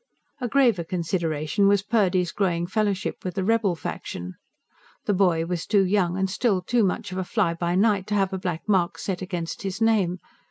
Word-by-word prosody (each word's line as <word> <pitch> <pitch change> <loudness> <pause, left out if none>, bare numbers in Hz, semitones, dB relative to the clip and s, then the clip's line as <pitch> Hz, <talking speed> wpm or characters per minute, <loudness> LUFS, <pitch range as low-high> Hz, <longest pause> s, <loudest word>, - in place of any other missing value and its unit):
A 250 - -2
graver 235 -8 +3
consideration 165 +1 0
was 200 -1 +3
Purdy's 185 -6 +1
growing 175 -4 0
fellowship 200 0 -1
with 180 -2 -4
the 190 - -1
rebel 215 -3 +2
faction. 90 - -6 0.7
The 205 - +2
boy 180 -4 +2
was 175 -1 -3
too 200 -2 +3
young 185 -2 +1
and 190 0 +1
still 190 -1 0
too 235 +4 +2
much 200 +1 -1
of 185 - -3
a - - -1
fly 170 -1 0
by 170 +1 -1
night 200 -1 +2
to 210 - -1
have 195 -1 +1
a 190 - -2
black 180 -1 -4
mark 185 -4 +2
set 190 -2 -3
against 175 -3 -4
his 195 0 -4
name. 210 -6 +2
190 Hz, 195 wpm, -25 LUFS, 175-205 Hz, 0.7 s, graver